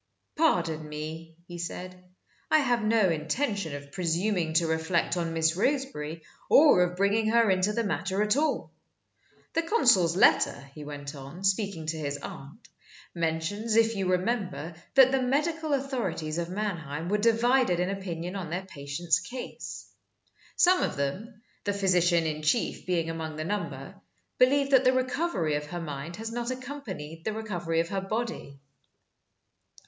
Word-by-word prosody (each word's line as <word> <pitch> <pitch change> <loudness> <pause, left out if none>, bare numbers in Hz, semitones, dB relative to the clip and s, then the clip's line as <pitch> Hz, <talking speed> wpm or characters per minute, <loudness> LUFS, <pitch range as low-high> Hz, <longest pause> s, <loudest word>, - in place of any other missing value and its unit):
"Pardon 160 - +1
me," 160 +2 -7
he 175 -1 -8
said. 180 +1 -6 0.5
"I 310 - +6
have 245 -5 +2
no 215 -2 +3
intention 165 - -1
of 140 0 -9
presuming 175 0 0
to 165 +1 +3
reflect 160 +2 0
on 170 -2 -1
Miss 160 0 +2
Roseberry, 180 - -1 0.3
or 290 -11 +7
of 180 0 0
bringing 205 +3 +2
her 230 -2 +4
into 185 +2 +2
the 230 +2 -1
matter 195 -1 -1
at 210 +2 +2
all. 305 +2 0 0.8
The 330 - +2
consul's 245 - +4
letter," 140 -6 +3
he 150 - -9
went 145 0 -7
on, 140 +6 -10
speaking 195 -4 0
to 160 0 -3
his 145 -2 -2
aunt, 140 - -10 0.5
"mentions, 170 +7 -1
if 225 0 +4
you 195 -2 -1
remember, 185 -3 -1 0.2
that 265 -1 +8
the 270 -1 +2
medical 305 +5 0
authorities 190 - -2
of 170 0 -3
Mannheim 170 -6 -3
were 210 +3 +1
divided 230 -3 +3
in 180 +2 0
opinion 180 -2 -5
on 185 -5 -4
their 180 +3 -3
patient's 155 0 -1
case. 250 +1 -7 0.7
Some 365 +1 +5
of - - -1
them 205 - -4 0.2
the 205 - 0
physician 180 -4 +3
in 155 -1 -2
chief 150 +4 0
being 165 -3 0
among 160 -1 -5
the 155 0 -4
number 165 -8 -4 0.5
believe 275 +2 +4
that 265 -1 +6
the 255 0 +4
recovery 255 - 0
of 150 0 -2
her 175 +3 -5
mind 150 0 -6
has 225 +3 -6
not 240 +1 -3
accompanied 245 - -6
the 215 - -2
recovery 175 -7 -1
of 165 - -5
her 195 -1 -2
body." 215 -8 -4
185 Hz, 155 wpm, -28 LUFS, 160-230 Hz, 0.8 s, that